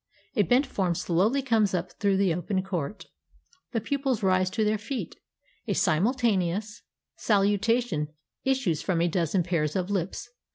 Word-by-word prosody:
A 215 - +4
bent 245 - +3
form 185 -8 -1
slowly 205 +13 +1
comes 220 -6 +2
up 180 0 -3
through 200 -2 +2
the 190 -3 +2
open 185 +3 -1
court. 185 -1 -4 0.7
The 230 - 0
pupils 265 -1 -1
rise 185 -1 +3
to 215 +3 0
their 210 0 +1
feet. 235 +4 -5 0.5
A - - +1
simultaneous 205 - +1 0.4
salutation 205 -4 +1 0.4
issues 260 - +1
from 180 -3 0
a 170 - +3
dozen 175 +1 +1
pairs 160 -3 -1
"of 185 +1 -1
lips. 195 +3 -2
195 Hz, 150 wpm, -27 LUFS, 175-225 Hz, 0.7 s, A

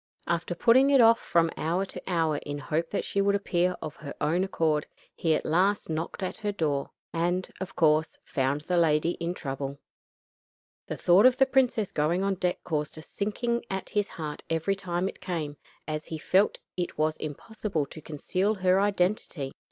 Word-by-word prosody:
After 170 +1 -1
putting 255 +8 +5
it 275 -1 +5
off 230 -1 +7
from 165 -1 +2
hour 175 +4 0
to - - -8
hour 165 -4 +1
in 145 0 -5
hope 155 +4 -2
that 205 - -2
she 200 - 0
would 200 0 +3
appear 180 -2 +1
of 150 - -6
her 140 -2 -8
own 165 +5 +1
accord, 160 -5 0 0.3
he 160 -2 +2
at - - -2
last 185 +3 +2
knocked 160 +5 -3
at 185 - -3
her 210 -1 -2
door, 150 -8 -1 0.2
and, 175 +2 0
of 190 0 -5
course, 155 -1 +3
found 140 -1 0
the 180 +3 -1
lady 165 0 +3
in 170 +1 -1
trouble. 140 -2 -4 1.1
The - - -4
thought 185 +7 +6
of 255 0 +3
the 270 - +6
princess 255 -6 +2
going 165 +5 +1
on 195 0 +1
deck 180 -1 -1
caused 150 -2 -2
a - - -7
sinking 235 +6 -2
at 190 0 -3
his 205 -1 0
heart 150 -3 -6
every 165 +5 +1
time 180 -1 -2
it - - -8
came, 155 -5 -3 0.3
as 155 0 -3
he 160 - -5
felt 190 +6 +3
that 180 - -7
it - - -14
was 155 +1 +1
almost - - -15
impossible 165 +1 -3
to 155 - -11
conceal 185 +8 -1
her 185 0 +3
identity. 180 -8 0
175 Hz, 190 wpm, -28 LUFS, 155-195 Hz, 1.1 s, off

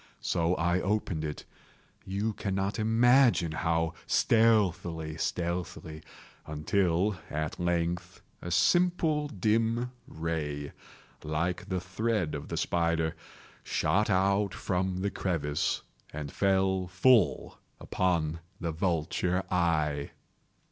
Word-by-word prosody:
So 85 +1 +1
I 85 +2 +1
opened 95 -5 -1
it—you 95 +7 -6
cannot 100 +1 -2
imagine 115 - +4
how 80 +2 0
stealthily, 90 -8 +2
stealthily—until, 85 +2 -2
at 80 +2 -3
length 85 +1 -2 0.2
a 90 - -5
simple 155 - +2
dim 115 +2 0 0.2
ray, 75 -3 -3 0.5
like 85 +5 -2
the 95 -1 0
thread 95 -1 -1
of 70 - -5
the - - -4
spider, 85 -2 0 0.5
shot 105 +1 +1 0.5
from 95 0 -1
out 90 - -4
the 100 - 0
crevice 75 -5 -1 0.3
and 75 -1 -6
fell 95 -1 +1
full 100 +4 +3 0.2
upon 85 -3 0 0.2
the 85 -1 -2
vulture 90 +2 0
eye. 80 -5 +1
90 Hz, 95 wpm, -29 LUFS, 80-100 Hz, 0.5 s, imagine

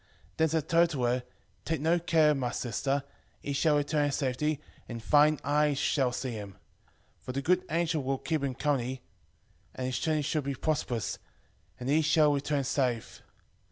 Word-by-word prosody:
5:20 - - -34 0.3
Then 160 0 +3
said 160 0 -1
Tobit 170 0 +4
to 140 -6 -3
her, 120 +1 +1 0.4
Take 160 -2 -1
no 165 +4 +2
care, 160 -3 +4
my 130 -4 -1
sister; 135 +4 -1 0.4
he 140 - -4
shall 150 +1 +3
return 145 0 +1
in 145 - 0
safety, 140 +2 -1 0.3
and 120 -1 -5
thine 150 +5 +4
eyes 150 0 +2
shall 135 -2 +1
see 130 +1 -3
him. 105 -3 -7 0.7
5:21 - - -34
For - - -5
the 140 - -1
good 180 +3 +3
angel 165 -1 0
will 135 0 -1
keep 155 +1 -2
him 135 -2 -2
company, 130 -3 -1 0.7
and 130 - -3
his 130 -1 -2
journey 155 -2 0
shall 155 +2 0
be 140 0 -3
prosperous, 130 -7 -2 0.6
and 125 - -5
he 150 +3 +3
shall 150 -1 +4
return 145 0 0
safe. 125 -4 -1
145 Hz, 185 wpm, -29 LUFS, 130-155 Hz, 0.7 s, Tobit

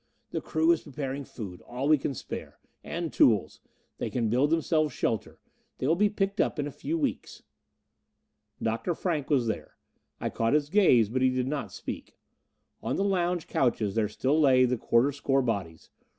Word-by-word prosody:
The - - -2
crew 160 +1 +2
is 170 - +2
preparing 140 -1 -5
food, 95 -9 -8
all 125 +3 -4
we 155 -1 +5
can 135 - -3
spare. - - -7 0.3
And - - -4
tools. - - +3 0.4
They - - -2
can 115 -3 0
build 130 +5 +3
themselves 155 -3 +1
shelter 110 - -2 0.4
they - - -3
will 160 +4 +3
be 205 +3 +3
picked 200 0 0
up - - 0
in 145 - -1
a 145 - -5
few 325 - -3
weeks." 285 -5 -3 1.2
Dr. 115 +10 -1
Frank 155 -6 -2
was 135 -5 +3
here. 110 - -4 0.4
I - - -2
caught 115 +2 0
his 150 -1 +2
gaze, 150 - +5
but 130 +3 -1
he 130 - +5
did 130 0 -1
not 145 0 -3
speak. - - -7 0.7
On - - -2
the 195 - 0
lounge 180 -3 0
couches 115 -6 0
there 110 -1 +1
still 135 +8 +1
lay 130 -3 +6
the 125 0 +1
quarter 120 +4 +2
score 135 -1 +1
bodies. 95 -9 -3
140 Hz, 180 wpm, -28 LUFS, 120-160 Hz, 1.2 s, lay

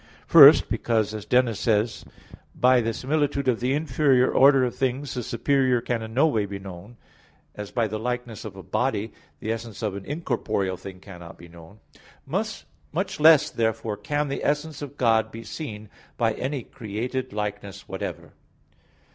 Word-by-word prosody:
First, - - +8
because 110 -3 0
as 105 -1 -7
Dionysius 125 -3 +2
says 110 0 0
(Div. - - -17
Nom. - - -20
i), - - -19 0.2
"by 125 0 +5
the 115 0 -1
similitudes 140 +2 -1
of 125 -3 +2
the 130 +3 0
inferior 135 -3 +2
order 135 -1 +6
of 125 - -1
things, 135 +1 -2
the 125 - -3
superior 130 +2 +1
can 115 0 -2
in 110 0 -7
no 140 +5 +5
way 110 -10 +1
be 100 0 -6
known;" 95 +4 -11 0.6
as 105 -1 -7
by 115 -3 0
the 110 +1 -4
likeness 125 -1 -4
of 105 -3 -8
a 95 - -10
body 110 -3 -1 0.3
the 110 - -3
essence 115 0 -6
of 105 -3 -2
an 100 - -7
incorporeal 120 - -2
thing 95 0 -10
cannot 90 -4 -11
be 85 - -13
known. 85 +5 -15 0.4
Much 190 +1 -4
less 155 -1 +6
therefore 110 -1 -1
can 145 +8 -2
the 140 - -4
essence 150 0 -1
of 145 0 -8
God 110 -2 +2
be 115 +1 -8
seen 110 -9 -7 0.3
by 115 -2 +1
any 135 -1 -3
created 125 +6 -5
likeness 105 -2 -5
whatever. - - -6
120 Hz, 175 wpm, -25 LUFS, 105-135 Hz, 0.6 s, First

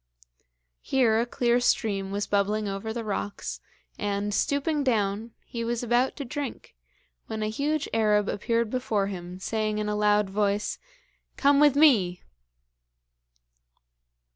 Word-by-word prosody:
Here 235 -4 +2
a 235 - 0
clear 240 0 +2
stream 210 -6 0
was 200 0 -1
bubbling 205 +1 0
over 195 +3 -4
the 230 0 -4
rocks, 205 -1 -4 0.4
and, 205 0 -1
stooping 285 +5 0
down, 220 -2 0
he 230 -1 -5
was 235 +1 -2
about 245 +2 +2
to 280 - -5
drink, 280 0 -6 0.5
when 220 -1 -3
a 215 - -1
huge 290 +5 -1
Arab 210 -2 +3
appeared 230 +2 -1
before 225 -6 0
him, 180 -2 -6
saying 215 +1 -1
in 210 0 -2
a 210 - -1
loud 210 0 +3
voice: 205 +1 -1 0.6
'Come 280 0 +4
with 295 -2 +5
me!' 220 - +4
220 Hz, 135 wpm, -27 LUFS, 205-245 Hz, 0.6 s, with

